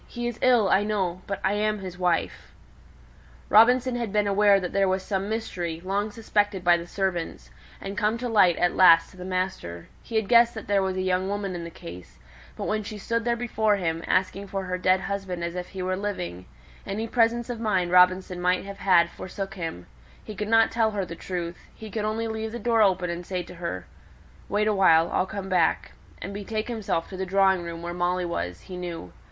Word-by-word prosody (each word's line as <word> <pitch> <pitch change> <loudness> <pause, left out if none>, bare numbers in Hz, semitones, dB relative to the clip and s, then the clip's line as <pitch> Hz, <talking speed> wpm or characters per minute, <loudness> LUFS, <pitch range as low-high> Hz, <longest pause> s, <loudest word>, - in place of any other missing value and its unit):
He 240 -1 -4
is 240 -2 -5
ill, 245 -5 +4
I 195 +2 +3
know; 190 -4 -1
but 200 - -3
I 190 - +2
am 210 +1 0
his 185 -3 -7
wife." 175 -2 -1 1.0
Robinson 245 +4 +5
had 235 -4 -3
been 210 0 +2
aware 200 0 +4
that 180 -2 -5
there 195 -1 +3
was 190 0 0
some 195 0 -2
mystery, 180 -7 -3
long 200 +3 -1
suspected 205 -3 -1
by 175 -1 +6
the 170 0 -5
servants, 185 -3 -3 0.3
and 195 +1 -6
come 215 +1 +1
to 245 +1 -4
light 190 -7 +4
at 175 - +1
last 170 -3 +6
to - - -17
the 180 - -8
master, 185 - -4
he 230 - -9
had 220 -2 +1
guessed 235 +1 +5
that 220 - -7
there 200 -1 +2
was 190 -1 -1
a 185 - -1
young 185 +1 0
woman 200 -2 -3
in 175 -1 -5
the - - -6
case; 90 - -11 0.4
but - - -4
when 215 0 0
she 215 +1 -7
stood 230 +3 -2
there 235 -1 +2
before 220 -3 +1
him, 165 -4 -2
asking 190 +2 0
for 195 0 -3
her 185 0 -3
dead 185 +1 +3
husband 190 -3 -4
as 170 0 -3
if 180 0 -5
he 190 -2 -6
were 185 0 -1
living, 90 - -5 0.4
any 220 +3 -3
presence 235 0 +2
of 240 -2 -5
mind 190 -6 0
Robinson 180 0 +4
might 180 +1 +1
have 200 0 -8
had 175 -3 +4
forsook 195 +2 -7
him; 165 - -6 0.4
he 215 - -8
could 210 0 -4
not 225 0 +4
tell 225 -1 +2
her 205 -3 -2
the 170 - -8
truth, 175 0 -5 0.2
he 220 -1 -10
could 215 0 -2
only 220 +1 -1
leave 220 0 -4
the 235 - -5
door 230 0 +2
open, 185 -3 +2
and 170 +1 -5
say 180 0 -3
to 175 - -12
her, 170 - -5 0.6
"Wait 210 +1 +1
awhile, 185 -6 +4
I'll 185 - +1
come 200 -1 -6
back," 180 -4 +1 0.3
and 200 - -6
betake 215 +3 -4
himself 210 -8 -2
to 190 - -7
the 190 - -2
drawing 190 0 +3
room 170 0 -7
where 175 0 -4
Molly 180 +1 0
was, 90 - -4
he 185 - -9
knew. 170 - -6
195 Hz, 220 wpm, -26 LUFS, 180-215 Hz, 1.0 s, by